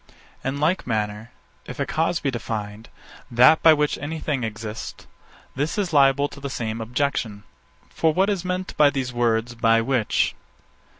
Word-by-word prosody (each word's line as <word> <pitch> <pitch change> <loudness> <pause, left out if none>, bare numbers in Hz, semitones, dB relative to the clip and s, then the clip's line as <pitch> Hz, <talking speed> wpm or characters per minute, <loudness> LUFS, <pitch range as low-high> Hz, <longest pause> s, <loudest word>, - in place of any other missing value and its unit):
_ - - -22 0.3
In 135 +2 -2
like 160 +2 0
manner, 105 -1 -2 0.4
if - - -8
a - - 0
cause 165 +2 0
be 140 - -1
defined, 110 -2 -5 0.4
that 125 +7 +6
by 165 - +8
which 150 -1 +1
any 155 +2 -4
thing 140 -5 -2
exists; 110 0 -6 0.5
this 145 +9 -2
is 190 -5 -1
liable 140 0 +4
to - - -12
the 140 0 -5
same 115 -3 -4
objection. 115 -3 -2 0.4
For 160 - +1
what 190 +5 +2
is 200 -4 -1
meant 185 0 -3
by 150 -1 +6
these 130 -3 -3
words, 120 0 0
_by 115 -1 +2
which? 125 -5 +1
135 Hz, 170 wpm, -23 LUFS, 115-150 Hz, 0.5 s, by